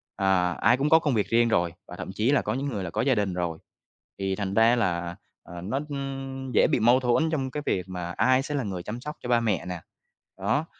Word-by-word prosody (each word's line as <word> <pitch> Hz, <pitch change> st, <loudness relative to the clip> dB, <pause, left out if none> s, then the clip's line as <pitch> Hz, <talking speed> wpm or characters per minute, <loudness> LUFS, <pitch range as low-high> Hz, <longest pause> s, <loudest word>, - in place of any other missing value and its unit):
Ờ, 90 Hz, -3 st, +2 dB
ai 120 Hz, +4 st, +5 dB
cũng 145 Hz, +3 st, +1 dB
có 160 Hz, -, +7 dB
công 145 Hz, -4 st, 0 dB
việc 105 Hz, -3 st, +1 dB
riêng 120 Hz, +1 st, +4 dB
rồi, 85 Hz, -6 st, +1 dB
và -, -, -9 dB
thậm -, -, -6 dB
chí 110 Hz, +6 st, +2 dB
là 145 Hz, -, +3 dB
có -, -, -2 dB
những 135 Hz, +2 st, -2 dB
người 105 Hz, -8 st, -3 dB
là 90 Hz, -, -4 dB
có -, -, -1 dB
gia 130 Hz, -1 st, +3 dB
đình 100 Hz, -3 st, 0 dB
rồi. 85 Hz, -2 st, -2 dB, 0.6 s
Thì 95 Hz, -1 st, -1 dB
thành 100 Hz, -1 st, -3 dB
ra 115 Hz, +2 st, +5 dB
là, 85 Hz, -6 st, -1 dB, 0.3 s
à, 85 Hz, 0 st, -9 dB
nó, 110 Hz, +10 st, -2 dB
ưm, 135 Hz, -1 st, -5 dB
dễ -, -, +5 dB
bị -, -, +3 dB
mâu 120 Hz, +4 st, +5 dB
thuẫn 130 Hz, +6 st, +2 dB
trong 135 Hz, -4 st, -1 dB
cái 150 Hz, +1 st, -4 dB
việc 90 Hz, 0 st, -1 dB
mà 90 Hz, -1 st, -4 dB
ai 130 Hz, +8 st, +3 dB
sẽ 145 Hz, +1 st, -4 dB
là 140 Hz, -, 0 dB
người 95 Hz, -5 st, -4 dB
chăm 115 Hz, +6 st, -6 dB
sóc 150 Hz, +3 st, -6 dB
cho 120 Hz, -, -5 dB
ba 120 Hz, -1 st, +4 dB
mẹ 110 Hz, -4 st, 0 dB
nè. 90 Hz, -2 st, -5 dB, 0.6 s
Đó, 115 Hz, +11 st, 0 dB
115 Hz, 255 wpm, -26 LUFS, 95-135 Hz, 0.6 s, có